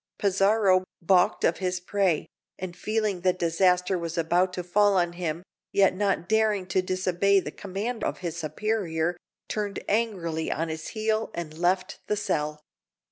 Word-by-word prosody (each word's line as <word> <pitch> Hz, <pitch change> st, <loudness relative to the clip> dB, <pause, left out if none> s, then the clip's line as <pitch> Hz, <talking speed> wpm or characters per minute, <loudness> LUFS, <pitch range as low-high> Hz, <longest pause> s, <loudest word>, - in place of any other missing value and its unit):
Pizarro, 195 Hz, -1 st, +3 dB, 0.2 s
baulked 180 Hz, 0 st, +3 dB
of 170 Hz, -, +3 dB
his 180 Hz, -1 st, -1 dB
prey, 180 Hz, -3 st, +1 dB, 0.3 s
and 180 Hz, -2 st, -6 dB
feeling 215 Hz, -3 st, -1 dB
that 185 Hz, 0 st, +2 dB
disaster 180 Hz, +2 st, +2 dB
was 170 Hz, 0 st, -4 dB
about 175 Hz, +3 st, +2 dB
to 180 Hz, -, -3 dB
fall 200 Hz, +3 st, +3 dB
on 175 Hz, -1 st, +1 dB
him, 175 Hz, -1 st, -3 dB, 0.3 s
yet 195 Hz, -2 st, +4 dB
not 195 Hz, -3 st, 0 dB
daring 215 Hz, -3 st, +2 dB
to 185 Hz, +1 st, +2 dB
disobey 185 Hz, +1 st, +2 dB
the 150 Hz, -, -5 dB
command 205 Hz, +7 st, -4 dB
of -, -, -1 dB
his 170 Hz, -3 st, -4 dB
superior, 175 Hz, -1 st, -1 dB, 0.3 s
turned 205 Hz, -2 st, -3 dB
angrily 185 Hz, -8 st, -1 dB
on 165 Hz, +2 st, -1 dB
his 160 Hz, 0 st, -5 dB
heel, 220 Hz, 0 st, 0 dB
and 160 Hz, -3 st, -5 dB
left 175 Hz, +3 st, 0 dB
the 210 Hz, -, 0 dB
cell. 150 Hz, -6 st, -2 dB
185 Hz, 155 wpm, -26 LUFS, 170-200 Hz, 0.3 s, yet